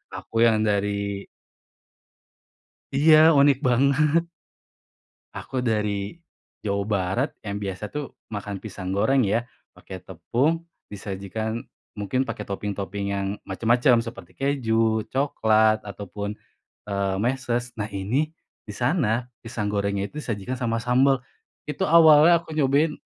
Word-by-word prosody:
aku 115 Hz, +1 st, +1 dB
yang 110 Hz, -1 st, +2 dB
dari 100 Hz, -1 st, -1 dB, 1.7 s
Iya, 155 Hz, +3 st, +6 dB, 0.2 s
unik 140 Hz, -2 st, +5 dB
banget. 140 Hz, +6 st, +3 dB, 1.1 s
Aku 130 Hz, -2 st, -4 dB
dari 105 Hz, +3 st, -1 dB, 0.4 s
Jawa 100 Hz, -1 st, -1 dB
Barat, 95 Hz, -3 st, 0 dB, 0.2 s
yang 100 Hz, -, -3 dB
biasa 95 Hz, +2 st, -4 dB
tuh 145 Hz, +3 st, -6 dB, 0.2 s
makan 100 Hz, -2 st, -5 dB
pisang 95 Hz, -3 st, -6 dB
goreng 115 Hz, +7 st, +3 dB
ya, 115 Hz, +5 st, 0 dB, 0.2 s
pakai 95 Hz, -1 st, -11 dB
tepung, 140 Hz, -, -1 dB, 0.3 s
disajikan 105 Hz, +3 st, -4 dB, 0.3 s
mungkin 105 Hz, +6 st, -1 dB
pakai 115 Hz, -2 st, -4 dB
topping-topping 100 Hz, 0 st, -4 dB
yang 100 Hz, 0 st, -2 dB, 0.2 s
macem-macem, 120 Hz, +4 st, +3 dB
seperti 115 Hz, -, -9 dB
keju, 115 Hz, -5 st, +1 dB
coklat, 110 Hz, -5 st, +3 dB
ataupun, 100 Hz, +1 st, -6 dB, 0.5 s
eee, 100 Hz, -1 st, -1 dB
meses, 120 Hz, -1 st, -1 dB
nah 105 Hz, -, -1 dB
ini 110 Hz, +11 st, -1 dB, 0.4 s
di -, -, -5 dB
sana, 120 Hz, -, 0 dB, 0.2 s
pisang 115 Hz, -3 st, -3 dB
gorengnya 100 Hz, -1 st, -1 dB
itu 150 Hz, -, -6 dB
disajikan 115 Hz, +3 st, -3 dB
sama 115 Hz, -2 st, 0 dB
sambel. 130 Hz, +2 st, +3 dB, 0.5 s
Itu 150 Hz, -, -2 dB
awalnya 160 Hz, +1 st, +7 dB
aku 160 Hz, -, -11 dB
nyobain 150 Hz, +2 st, +2 dB
110 Hz, 115 wpm, -24 LUFS, 100-130 Hz, 1.7 s, awalnya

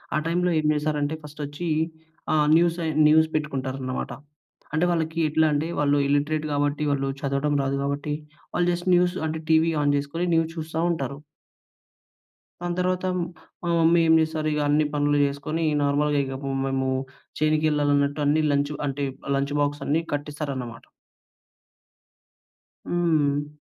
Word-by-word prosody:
ఆ -, -, +3 dB
టైంలో 180 Hz, +2 st, +1 dB
ఏం 155 Hz, -, -2 dB
చేశారంటే 150 Hz, 0 st, -1 dB
ఫస్టొచ్చీ 150 Hz, +3 st, -6 dB, 0.6 s
ఆహ్, 150 Hz, -1 st, +3 dB
న్యూసయి 170 Hz, -1 st, +2 dB, 0.2 s
న్యూస్ 160 Hz, +1 st, +5 dB
పెట్టుకుంటారనమాట. 135 Hz, -3 st, -3 dB, 0.6 s
అంటే, 160 Hz, +3 st, +2 dB
వాళ్ళకి 165 Hz, -1 st, -1 dB
ఎట్లా 160 Hz, +1 st, +3 dB
అంటే, 150 Hz, +3 st, 0 dB
వాళ్ళు 145 Hz, 0 st, +3 dB
ఇల్లిటరేట్ 150 Hz, +2 st, 0 dB
గాబట్టి, 145 Hz, +1 st, 0 dB
వాళ్ళు 135 Hz, -1 st, 0 dB
చదవటం 140 Hz, +1 st, 0 dB
రాదు 135 Hz, 0 st, -1 dB
గాబట్టి, 140 Hz, +1 st, -2 dB, 0.4 s
వాళ్ళు 175 Hz, 0 st, +2 dB
జస్ట్ 175 Hz, +2 st, -3 dB
న్యూస్ 180 Hz, +1 st, +2 dB
అంటే, 160 Hz, +1 st, -3 dB
టీవీ 160 Hz, +1 st, +4 dB
ఆన్ 145 Hz, 0 st, +3 dB
జేసుకొని 145 Hz, +5 st, -2 dB
న్యూస్ 165 Hz, 0 st, +1 dB
చూస్తా 160 Hz, +1 st, -3 dB
ఉంటారు. 140 Hz, -4 st, -3 dB, 1.4 s
దాని 175 Hz, 0 st, -2 dB
తర్వాత 185 Hz, 0 st, 0 dB
మ్ 175 Hz, -, 0 dB, 0.4 s
మా 175 Hz, -, -2 dB
మమ్మీ 165 Hz, +1 st, +5 dB
ఏం 160 Hz, -, +6 dB
చేస్తారిగ, 155 Hz, -1 st, -1 dB
అన్ని 150 Hz, +1 st, +3 dB
పనులు 145 Hz, 0 st, +2 dB
చేసుకొని, 145 Hz, +3 st, -3 dB
ఈ -, -, 0 dB
నార్మల్‌గా 145 Hz, +1 st, +2 dB
ఇగ 135 Hz, 0 st, -5 dB
పు 135 Hz, -, -3 dB
మేమూ 135 Hz, -1 st, 0 dB, 0.5 s
చేనుకెళ్ళాలన్నట్టు 150 Hz, -2 st, +2 dB
అన్ని 155 Hz, +2 st, +3 dB
లంచ్ 145 Hz, +1 st, 0 dB
అంటే 140 Hz, +1 st, -2 dB, 0.3 s
లంచ్ 140 Hz, +1 st, -1 dB
బాక్సన్నీ 145 Hz, +2 st, 0 dB
కట్టిస్తారనమాట. 145 Hz, -5 st, -4 dB, 2.0 s
హ్మ్. 150 Hz, -4 st, +1 dB
150 Hz, 135 wpm, -25 LUFS, 145-160 Hz, 2.0 s, ఏం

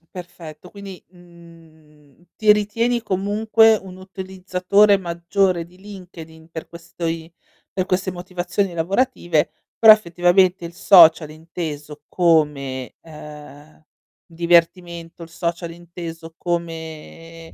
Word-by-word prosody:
Perfetto. 175 Hz, -2 st, -11 dB
Quindi, 200 Hz, -2 st, -11 dB
mhmm, 165 Hz, -4 st, -20 dB
ti 215 Hz, -1 st, +4 dB
ritieni 230 Hz, +3 st, -1 dB
comunque 215 Hz, +3 st, +2 dB
un 190 Hz, -3 st, -9 dB
utilizzatore 190 Hz, +1 st, +1 dB
maggiore 175 Hz, 0 st, -1 dB
di 180 Hz, +1 st, -21 dB
LinkedIn 175 Hz, -5 st, -13 dB
per 160 Hz, -1 st, -8 dB
questi 165 Hz, -1 st, -6 dB, 0.5 s
per 185 Hz, -, 0 dB
queste 185 Hz, 0 st, -1 dB
motivazioni 180 Hz, +1 st, -3 dB
lavorative, 175 Hz, -, 0 dB, 0.3 s
però 220 Hz, -1 st, +9 dB
effettivamente 180 Hz, -1 st, +1 dB
il 170 Hz, -, -9 dB
social 165 Hz, -5 st, +6 dB
inteso 155 Hz, -2 st, -8 dB
come, 150 Hz, -7 st, 0 dB
uhm, 150 Hz, -1 st, -13 dB, 0.4 s
divertimento, 170 Hz, 0 st, 0 dB
il 165 Hz, -, -10 dB
social 170 Hz, +1 st, -4 dB
inteso 165 Hz, -1 st, -10 dB
come, 165 Hz, -1 st, -6 dB
170 Hz, 100 wpm, -20 LUFS, 160-185 Hz, 0.5 s, però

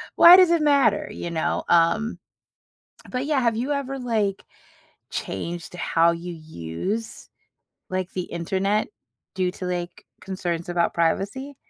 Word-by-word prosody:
why 345 Hz, +1 st, +10 dB
does 365 Hz, -2 st, +6 dB
it 335 Hz, -, +3 dB
matter?" 280 Hz, -8 st, +3 dB
you 170 Hz, -, -5 dB
know? 160 Hz, -, -1 dB
Um, 170 Hz, +7 st, +2 dB, 0.9 s
but, 255 Hz, +1 st, -2 dB
yeah, 290 Hz, -2 st, +1 dB
have 235 Hz, -2 st, +1 dB
you 255 Hz, +5 st, -2 dB
ever, 275 Hz, -1 st, -2 dB
like, 215 Hz, -6 st, -1 dB, 0.7 s
changed 175 Hz, +1 st, -5 dB
how 170 Hz, -1 st, +2 dB
you 170 Hz, +1 st, -5 dB
use, 160 Hz, -, -5 dB, 0.6 s
like, 185 Hz, 0 st, -3 dB
the 185 Hz, -, -2 dB
Internet 190 Hz, +5 st, -1 dB, 0.5 s
due 185 Hz, -1 st, 0 dB
to, 185 Hz, -, -7 dB
like, 175 Hz, -1 st, -4 dB, 0.2 s
concerns 175 Hz, -3 st, -4 dB
about 175 Hz, -1 st, +1 dB
privacy? 200 Hz, +12 st, -1 dB
190 Hz, 135 wpm, -24 LUFS, 170-245 Hz, 0.9 s, why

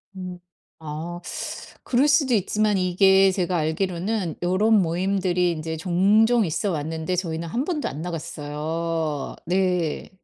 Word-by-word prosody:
음 180 Hz, -1 st, -7 dB, 0.5 s
아 165 Hz, +4 st, -5 dB, 0.6 s
그럴 270 Hz, +4 st, +2 dB
수도 285 Hz, -4 st, +3 dB
있지만 210 Hz, 0 st, +1 dB
이게 190 Hz, +1 st, +4 dB
제가 180 Hz, -1 st, -1 dB
알기로는 175 Hz, +3 st, -1 dB
요론 205 Hz, +4 st, +3 dB
모임들이 180 Hz, 0 st, +1 dB
이제 160 Hz, 0 st, -4 dB
종종 205 Hz, +7 st, +3 dB
있어 165 Hz, +5 st, -1 dB
왔는데 160 Hz, +3 st, -2 dB
저희는 170 Hz, -2 st, -3 dB
1 240 Hz, +11 st, -1 dB
번도 310 Hz, -4 st, -2 dB
안 145 Hz, +3 st, -6 dB
나갔어요. 160 Hz, -1 st, -3 dB
네. 180 Hz, -3 st, 0 dB
180 Hz, 250 characters per minute, -24 LUFS, 160-195 Hz, 0.6 s, 이게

